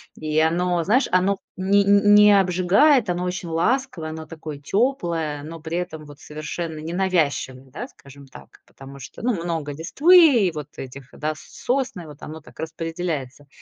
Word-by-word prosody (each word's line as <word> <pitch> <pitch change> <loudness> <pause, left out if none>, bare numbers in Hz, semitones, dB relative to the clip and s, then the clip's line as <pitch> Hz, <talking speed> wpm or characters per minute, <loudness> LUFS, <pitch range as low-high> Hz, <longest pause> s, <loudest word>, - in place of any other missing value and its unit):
и 155 0 -1
оно, 175 +2 +1
знаешь, 245 +6 +2
оно 185 +2 +3
в - - -25 0.2
не 200 +2 +3
ни 200 +1 +4
не 205 -1 +7
обжигает, 190 - +3
оно 180 +1 -1
очень 180 -1 -4
ласковое, 175 -1 -1
оно 160 0 -7
такое 155 -3 -8
тёплое, 170 - -1
но 165 +2 -8
при 165 +2 -4
этом 160 -4 -5
вот 145 -1 -14
совершенно 155 +1 -6
ненавязчивое, 155 -6 -1
да, 245 - -6
скажем 140 - -16
так? 70 - -16
Потому 135 +1 -13
что, 130 - -11
ну, 245 +1 +1
много 160 -4 -3
листвы, 270 - +5
вот 150 -2 -6
этих, 135 0 -9
да, 155 +1 -3
сосны, 245 - -3
вот 150 -1 -13
оно 160 +1 -8
так - - -18
распределяется. 160 -4 -5
165 Hz, 165 wpm, -22 LUFS, 150-195 Hz, 0.2 s, не